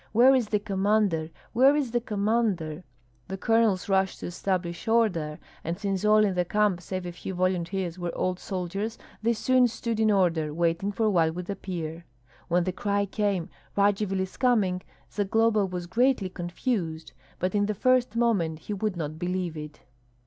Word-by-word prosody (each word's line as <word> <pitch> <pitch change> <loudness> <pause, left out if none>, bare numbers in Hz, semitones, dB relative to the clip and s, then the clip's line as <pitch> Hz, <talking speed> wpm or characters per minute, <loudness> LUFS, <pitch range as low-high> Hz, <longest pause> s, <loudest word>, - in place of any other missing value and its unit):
"Where 250 +4 +7
is 250 -5 +2
the 210 - +1
commander? 200 -5 +1 0.2
Where 265 +5 +6
is 280 -5 0
the 240 0 +1
commander?" 200 -7 0 0.4
The 190 - -5
colonels 225 -3 +2
rushed 190 -1 +1
to - - -4
establish 175 +1 -3
order; 185 -10 +1 0.3
and 170 +2 -3
since 195 -1 -2
all 215 0 +5
in 195 - 0
the 180 0 +1
camp, 205 -1 +1
save 185 0 -5
a 175 - -4
few 185 +2 -6
volunteers, 185 0 -1
were 175 -1 -2
old 185 0 -1
soldiers, 195 +4 -4 0.2
they 230 +2 +2
soon 255 +2 +3
stood 230 -1 -3
in 220 -1 +4
order, 165 -6 +2
waiting 170 +4 +1
for 220 +2 0
what 165 -3 +2
would 180 +2 -4
appear. 170 -4 -5 0.4
When 175 +1 +2
the 185 - -1
cry 200 +2 0
came, 200 -4 -1 0.3
"Radzivill 200 -1 +2
is 190 0 -5
coming!" 210 -8 +2 0.3
Zagloba 215 0 +2
was 180 -1 -5
greatly 230 +1 +2
confused; 175 -2 -3 0.2
but 185 +1 -1
in 205 -1 +2
the 215 - -1
first 255 +1 +2
moment 200 -10 +1
he 185 +6 -6
would 205 -2 -2
not 155 -1 -4
believe 180 -1 -2
it. 150 -1 -8
195 Hz, 170 wpm, -27 LUFS, 175-215 Hz, 0.4 s, Where